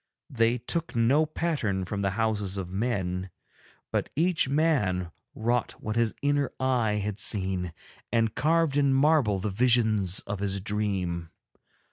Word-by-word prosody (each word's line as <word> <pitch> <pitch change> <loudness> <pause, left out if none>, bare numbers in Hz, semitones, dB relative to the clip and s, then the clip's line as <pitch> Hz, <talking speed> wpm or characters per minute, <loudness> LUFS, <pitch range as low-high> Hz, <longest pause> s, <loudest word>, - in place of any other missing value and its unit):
They 115 -1 +2
took 160 +7 -2
no 135 +7 +3
pattern 140 - -1
from 100 +2 -3
the 100 - +1
houses 105 -4 -1
of 90 -1 -5
men, 95 -4 -2 0.6
but - - -1
each 165 -2 +2
man 120 - +1 0.2
wrought 120 +2 0
what 110 0 -5
his 115 -2 +1
inner 145 -1 +2
eye 125 -5 +1
had 105 0 -3
seen 95 -4 0 0.4
and 115 -2 +1
carved 155 +2 +2
in 140 -2 +3
marble 135 -7 +3
the 100 +2 -3
visions 110 -4 +2
of 105 - -5
his 100 -1 -1
dream. 95 -5 -2
110 Hz, 140 wpm, -27 LUFS, 95-135 Hz, 0.6 s, no